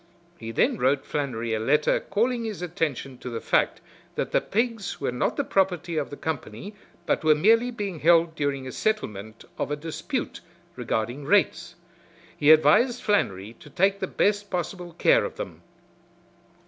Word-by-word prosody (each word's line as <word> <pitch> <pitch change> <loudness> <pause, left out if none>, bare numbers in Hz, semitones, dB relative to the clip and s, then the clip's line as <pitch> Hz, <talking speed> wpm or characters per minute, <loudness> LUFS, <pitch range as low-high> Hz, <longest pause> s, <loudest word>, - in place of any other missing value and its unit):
He 115 - -7
then 115 - +1
wrote 135 +2 +2
Flannery 120 -6 -2
a 110 - 0
letter 150 +7 +2
calling 235 +4 -1
his 215 -5 -5
attention 145 -6 -3
to 125 - -6
the 115 -1 -4
fact - - +1 0.3
that - - -2
the - - +3
pigs 225 -2 -2
were 135 - -1
not 125 - -1
the - - +1
property 180 -3 0
of 150 -3 -1
the 145 - -8
company 155 - -5 0.3
but - - 0
were 155 -1 +5
merely 225 +9 +4
being 205 -8 -5
held 165 +1 +4
during 140 -3 -2
a 130 - -6
settlement 110 - -3
of - - -1
a 145 - -1
dispute 160 +2 -4 0.3
regarding 120 +6 -3
rates. 200 +1 +1 0.6
He 145 - +2
advised 155 - +5
Flannery 105 - 0
to - - -14
take 195 +6 +1
the - - -2
best 205 0 0
possible 175 -1 -4
care - - +4
of - - -5
them. - - -7
160 Hz, 165 wpm, -25 LUFS, 135-205 Hz, 0.6 s, were